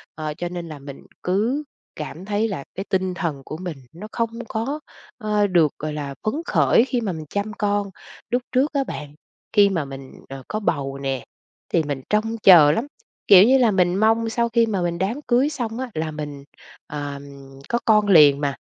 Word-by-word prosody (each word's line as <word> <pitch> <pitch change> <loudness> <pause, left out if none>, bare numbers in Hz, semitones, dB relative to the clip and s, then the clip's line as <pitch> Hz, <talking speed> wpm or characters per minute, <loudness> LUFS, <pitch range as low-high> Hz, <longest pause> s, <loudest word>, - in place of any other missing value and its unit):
Ờ, 155 -1 -4
cho 175 0 -3
nên 175 -1 -6
là 150 -2 -8
mình 140 0 -10 0.2
cứ 225 +11 0 0.3
cảm 160 +4 -7
thấy 210 +2 0
là 180 -10 -4
cái 195 +2 -4
tinh 185 -1 0
thần 165 -7 -3
của 155 - -6
mình 175 -5 -6 0.2
nó 200 +6 -9
không 230 -1 -1 0.2
có, 265 +8 -2 0.4
ờ, 210 -3 +1
được 170 -6 +3
gọi 155 0 -4
là 140 -2 -5
phấn 215 +5 -1
khởi 235 - +4
khi 250 -3 -1
mà 200 -4 -2
mình 155 -1 -7
chăm 205 +1 -3
con. 205 -1 -1 0.4
Lúc 245 +1 +1
trước 270 +4 +1
á 275 -1 +1
bạn, 150 - -7 0.4
khi 205 -2 +6
mà 165 -7 -1
mình, 135 -1 -9 0.2
ờ, 135 -1 -8
có 215 - -3
bầu 140 -8 -2
nè, 135 -2 -3 0.5
thì 165 - +3
mình 140 -2 -4
trông 225 +2 0
chờ 160 -6 +8
lắm, 230 - -1 0.4
kiểu 195 -1 +9
như 260 +4 +5
là, 235 -4 +4
mình 180 -2 +2
mong 225 +2 +2
sau 235 +1 0
khi 230 0 +3
mà 200 -5 -2
mình 170 -1 -1
đám 215 +10 -2
cưới 255 +4 +3
xong 240 -5 -4
á 260 - -4
là 155 0 -3
mình, 145 -2 -7 0.4
ờ, 145 -1 -5 0.5
có 235 - +1
con 210 -2 +4
liền 150 -6 +6
mà, 140 -1 -1
190 Hz, 205 wpm, -22 LUFS, 150-225 Hz, 0.5 s, kiểu